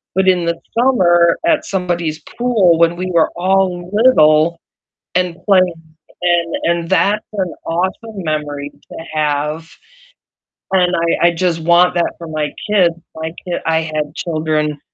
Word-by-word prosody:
but 190 0 +2
in 180 -2 +3
the 170 0 -2 0.2
summer 175 -9 +4
at 315 -2 +2
somebody's 170 -5 -3
pool 210 -9 +1
when 170 0 +3
we 185 +1 -4
were 165 -2 +3
all 180 -1 0
little 170 -8 +4 0.6
and 180 -2 0
playing. 185 -4 +3 0.5
And 175 -1 +1
and 170 0 0
that's 205 +2 +2
an 185 -4 -2
awesome 190 +4 -3
memory 145 -2 -3
to - - -14 0.2
have, 150 +2 -1 1.0
and 180 -2 +2 0.3
I 170 - +6
I - - +3
just 170 -1 -1
want 175 +2 +4
that 170 - 0
for 170 - -9
my 155 -1 -2 0.2
kids. 175 -5 +3 0.2
My 160 +1 -5
ki 175 - -2
I 160 0 +2
had 155 -1 -4
children 155 -3 -2
170 Hz, 145 wpm, -16 LUFS, 160-185 Hz, 1.0 s, I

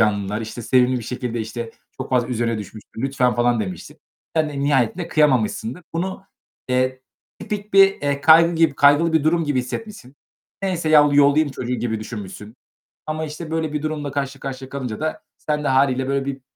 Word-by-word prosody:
canlılar, 105 -1 +1
işte 115 +2 -6
sevimli 125 +2 +3
bir - - -7
şekilde, 125 -1 -4
işte, 115 +1 -5 0.3
çok 130 - -6
fazla 125 -1 +1
üzerine 115 -2 -1
düşmüştür, 110 +2 -9
lütfen, 130 -3 +1
falan 120 -1 +2
demiştir. 95 -4 -6 0.4
Sen 155 -1 +2
de 140 -1 -5
nihayetinde 145 +4 +1
kıyamamışsındır. 130 -1 +1
Bunu, 190 +3 -3 0.4
eee, 130 0 0 0.4
tipik 210 0 -6
bir, 195 0 +6
eee, 140 -1 0
kaygı 165 +3 +6
gibi 165 -3 +3
kaygılı 145 +4 +4
bir 160 -2 +2
durum 165 +1 +2
gibi 145 -3 0
hissetmişsin. 135 - -8 0.5
Neyse, 180 -4 -1
ya, 150 -1 +6
yollayım 145 +2 +4
çocuğu 125 -1 -4
gibi 110 -3 -2
düşünmüşsün 105 -1 -8 0.5
ama, 155 +1 -2
işte, 155 +1 -8
böyle 160 -2 -2
bir 150 - -2
durumla 150 -2 -3
karşı 140 -1 -3
karşıya 130 -1 -6
kalınca 130 -6 -5
da 155 0 -3
sen 150 -1 -2
de - - -1
hâliyle 130 -1 +2
böyle 135 0 -1
bir 140 -1 -5
135 Hz, 180 wpm, -21 LUFS, 120-155 Hz, 0.5 s, bir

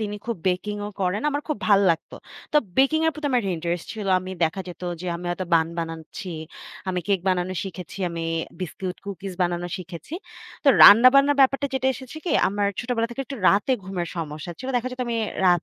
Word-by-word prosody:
তিনি 210 -1 -3
খুব 235 -3 -2
বেকিংও 205 +3 -2
করেন। 190 +2 0
আমার 290 +1 -2
খুব 305 - -1
ভাল 200 -2 +6
লাগতো। 165 - -3 0.4
তো - - +4 0.2
বেকিং 275 +4 +4
এর 320 - +4
প্রতি 300 0 -4
আমার 250 -2 +3
একটা 195 -2 -1
ইন্টারেস্ট 170 +1 -3
ছিল। 215 -2 -5
আমি 185 +1 -7
দেখা 165 +4 -2
যেত 180 - -10 0.2
যে 185 - -6
আমি 175 - -9
হয়তো 180 +1 -3
বান 160 -1 +3
বানাচ্ছি। 165 +3 -6 0.6
আমি 180 -1 0
কেক 195 -2 +2
বানানো 185 0 0
শিখেছি। 185 0 -8
আমি 165 -1 -4 0.4
বিস্কুট, 185 +1 -4
কুকিস 195 -1 -6
বানানো 175 0 -1
শিখেছি। 180 - -8 0.5
তো - - +6
রান্না-বান্নার 275 +6 +8
ব্যাপারটা 275 +1 +4
যেটা 265 0 0
এসেছে 260 +4 -10
কি 350 - -1 0.2
আমার 205 +1 0
ছোটবেলা 235 -2 -1
থেকে 240 - -5
একটু 275 - -6
রাতে 205 +6 +3
ঘুমের 180 -3 -3
সমস্যা 155 0 -5
ছিল। 260 - -6
দেখা 245 +1 -1
যেত 255 - -7
আমি 235 -1 -1 0.3
রাত 175 -2 +4
195 Hz, 195 wpm, -24 LUFS, 175-245 Hz, 0.6 s, রান্না-বান্নার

